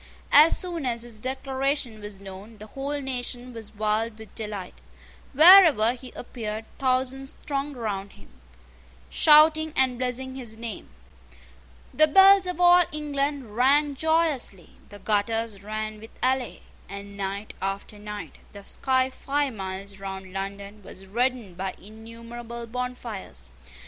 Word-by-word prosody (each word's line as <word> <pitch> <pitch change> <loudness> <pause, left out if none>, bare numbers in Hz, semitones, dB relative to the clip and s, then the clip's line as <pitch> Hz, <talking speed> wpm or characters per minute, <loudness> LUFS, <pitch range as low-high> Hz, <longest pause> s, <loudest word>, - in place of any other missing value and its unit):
As 305 +3 +7
soon 345 -4 -4
as 235 -1 -2
his 235 -3 -8
declaration 265 -1 -2
was 205 -2 -8
known, 200 +3 -11
the 210 - -10
whole 275 +6 -4
nation 250 -2 -4
was 225 -2 -10
wild 215 +1 -1
with 220 0 -13
delight. 210 -4 -6 0.6
Wherever 310 - +8
he 255 0 -10
appeared 220 -3 -6
thousands 265 +1 -1
thronged 280 -1 -3
round 200 -4 -4
him, 100 - -18 0.8
shouting 315 +1 +5
and 255 -2 +2
blessing 260 +1 -2
his 240 -4 -7
name. 230 -3 -7 1.0
The 310 +1 +5
bells 385 +3 +7
of 360 0 -4
all 355 0 +7
England 280 -5 -3
rang 285 +4 +4
joyously: 310 - 0 0.2
the 205 - -11
gutters 215 0 -1
ran 215 +1 -5
with 225 +1 -12 0.2
ale; 260 -1 -1 0.3
and, 200 +1 -9
night 200 +1 -4
after 195 +2 -4
night, 210 0 -8
the 200 -1 -11
sky 260 +4 0
five 280 0 -2
miles 195 0 -7
round 190 -1 -7
London 200 +2 -6
was 190 0 -11
reddened 235 -2 -2
by 190 0 -4
innumerable 230 +3 -9
bonfires. 230 - -6
235 Hz, 135 wpm, -25 LUFS, 205-270 Hz, 1.0 s, Wherever